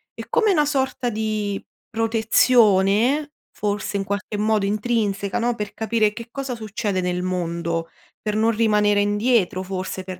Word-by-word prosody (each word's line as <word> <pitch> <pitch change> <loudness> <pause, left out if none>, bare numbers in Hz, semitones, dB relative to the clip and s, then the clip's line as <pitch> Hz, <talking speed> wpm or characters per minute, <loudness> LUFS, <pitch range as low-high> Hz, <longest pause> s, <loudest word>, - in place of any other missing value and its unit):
è - - -7
come 440 -3 +3
una 300 -5 +3
sorta 265 -3 -1
di 215 -2 -2 0.3
protezione, 225 +3 +3 0.2
forse, 205 0 -2
in 195 - -1
qualche 205 +1 -3
modo 215 -1 +1
intrinseca, 210 -1 -1
no, 240 0 0
per 210 -2 -5
capire 220 -1 +1
che 230 +2 -9
cosa 270 -2 -4
succede 210 -3 -2
nel 180 0 -1
mondo, 170 -2 -2 0.3
per 210 -1 -2
non 225 +1 +3
rimanere 210 -2 +3
indietro, 205 -2 +1
forse, 190 0 -4
per 185 -1 -8
210 Hz, 145 wpm, -22 LUFS, 195-230 Hz, 0.3 s, come